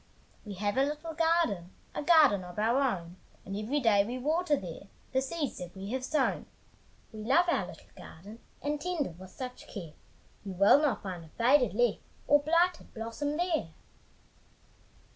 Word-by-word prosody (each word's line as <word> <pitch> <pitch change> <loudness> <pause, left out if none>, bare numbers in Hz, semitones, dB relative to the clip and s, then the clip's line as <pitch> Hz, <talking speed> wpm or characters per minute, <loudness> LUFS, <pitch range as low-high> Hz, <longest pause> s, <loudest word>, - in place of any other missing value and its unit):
We 200 - -6
have 205 +5 -1
a 270 - +5
little 300 +3 -3
garden, 325 - +1 0.2
A - - -3
garden 295 - +5
of 180 +1 -10
our 225 +3 +2
own, 180 -9 -2 0.3
And 195 - -5
every 220 +8 -1
day 215 -6 +4
we 240 +5 -4
water 305 +4 +1
there 180 0 -8 0.2
The 265 - +2
seeds 290 +1 -3
that 180 +1 -8
we 195 +2 -6
have 260 0 -2
sown. 270 0 0 0.7
We 215 - -8
love 330 +10 +4
our 340 - +1
little - - -13
garden, 205 +8 -12 0.2
And 295 0 -2
tend 350 -5 -1
it 170 -5 -9
with 185 0 -10
such 250 +5 -8
care, 170 -7 -8 0.5
You 195 -2 -6
will 200 +10 +6
not 295 -4 0
find 180 -4 -5
a - - -14
faded 245 - +3
leaf 240 -1 +2 0.3
Or 290 - +6
blighted 335 +3 +1
blossom 235 +7 -3
there. 320 - -1
250 Hz, 175 wpm, -30 LUFS, 200-295 Hz, 0.7 s, will